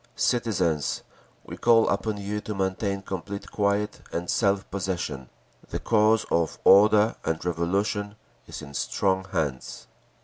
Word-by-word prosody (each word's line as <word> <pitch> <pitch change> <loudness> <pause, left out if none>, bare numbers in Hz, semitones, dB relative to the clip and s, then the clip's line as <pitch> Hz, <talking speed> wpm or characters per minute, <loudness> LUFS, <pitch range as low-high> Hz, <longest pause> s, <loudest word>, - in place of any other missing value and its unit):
Citizens! 100 -11 0 0.4
We - - -8
call 115 -1 +4
upon 110 -2 -1
you 100 +1 -4
to 105 0 -5
maintain 95 +1 -1
complete 100 +1 -6
quiet 105 0 0
and 85 +1 -2
self 100 -3 +1
possession. 90 -9 -3 0.4
The - - -3
cause 110 0 +3
of 80 -3 +1
order 105 +2 +6
and 80 +1 -2
Revolution 100 +4 -1 0.3
is - - -8
in 70 -1 -10
strong 95 +5 0
hands. 80 -9 -3
100 Hz, 130 wpm, -26 LUFS, 85-105 Hz, 0.4 s, order